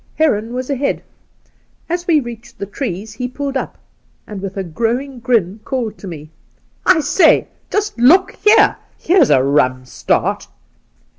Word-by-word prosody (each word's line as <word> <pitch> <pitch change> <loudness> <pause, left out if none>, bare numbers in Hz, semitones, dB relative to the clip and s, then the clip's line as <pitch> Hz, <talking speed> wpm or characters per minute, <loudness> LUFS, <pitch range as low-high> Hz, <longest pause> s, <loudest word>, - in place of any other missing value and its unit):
' - - -36
Heron 230 -8 +1
was 255 +2 -4
ahead. 275 +1 -1 0.8
As 350 +1 -3
we 325 -3 +4
reached 240 -3 -9
the - - -4
trees, 205 -1 -5
he 250 +3 -4
pulled 275 +2 -5
up, 265 - -3 0.5
and 205 -3 -8
with 195 0 -6
a 195 - -1
growing 235 - -2
grin 225 -5 0
called 235 -5 -3
to 200 - -9
me, 155 -3 -9 0.3
" - - -40
I - - +1
say, 325 +2 +3 0.2
just 415 - -2
look 330 +11 +5
here! 425 +1 +4 0.2
Here's 345 -6 +3
a 130 -3 +4
rum 130 -2 +1
start - - -1
240 Hz, 160 wpm, -17 LUFS, 195-285 Hz, 0.8 s, look